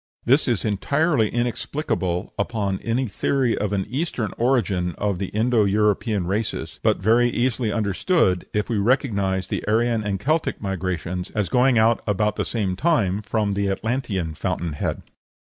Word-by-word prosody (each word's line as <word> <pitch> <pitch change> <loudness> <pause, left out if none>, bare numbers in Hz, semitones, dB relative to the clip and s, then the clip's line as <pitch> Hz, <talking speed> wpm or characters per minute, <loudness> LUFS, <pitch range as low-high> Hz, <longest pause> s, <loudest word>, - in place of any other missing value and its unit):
This 135 +6 +3
is 120 -4 0
entirely 130 - +1
inexplicable 115 - -2
upon 100 -5 -1
any 120 +3 -1
theory 125 +2 0
of 105 -1 -2
an 100 -2 0
Eastern 130 -5 -2
origin 100 -9 +1
of 100 -3 -1
the 95 - -2
Indo 115 +2 +2
European 105 0 +1
races, 95 -5 -3
but 110 -2 +2
very 115 +5 +3
easily 120 -2 0
understood 100 - +1
if 105 0 -1
we 115 -4 0
recognize 100 -5 +1
the - - -3
Aryan 115 +1 +2
and 100 -2 -2
Celtic 155 - 0
migrations 90 -2 -3
as 105 -3 0
going 125 -1 +3
out 110 +1 +4
about 105 +1 +1
the - - -1
same 100 -6 -1
time 105 - +1
from 105 0 -1
the 100 0 0
Atlantean 100 -5 -2
fountain 80 +1 -3
head. 75 - -3
105 Hz, 155 wpm, -23 LUFS, 95-120 Hz, -, out